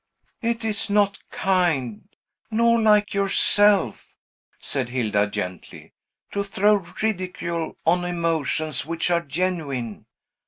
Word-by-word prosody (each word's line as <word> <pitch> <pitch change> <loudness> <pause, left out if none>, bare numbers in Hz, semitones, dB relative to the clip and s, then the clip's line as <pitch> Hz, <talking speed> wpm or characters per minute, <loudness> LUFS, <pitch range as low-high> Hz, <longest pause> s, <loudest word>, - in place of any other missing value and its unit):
"It 230 -1 -1
is 215 0 -1
not 205 -1 +2
kind, 170 - 0 0.4
nor 235 +1 +3
like 210 -1 +3
yourself," 200 - +3 0.4
said 130 -3 -3
Hilda 105 -5 0
gently, 90 -2 -7 0.4
"to 200 - -1
throw 205 +1 +2 0.2
ridicule 180 -5 -3
on 175 +2 +3
emotions 160 -4 0
which 165 +2 -2
are 170 -1 +2
genuine. 140 - -3
175 Hz, 105 wpm, -23 LUFS, 140-205 Hz, 0.4 s, nor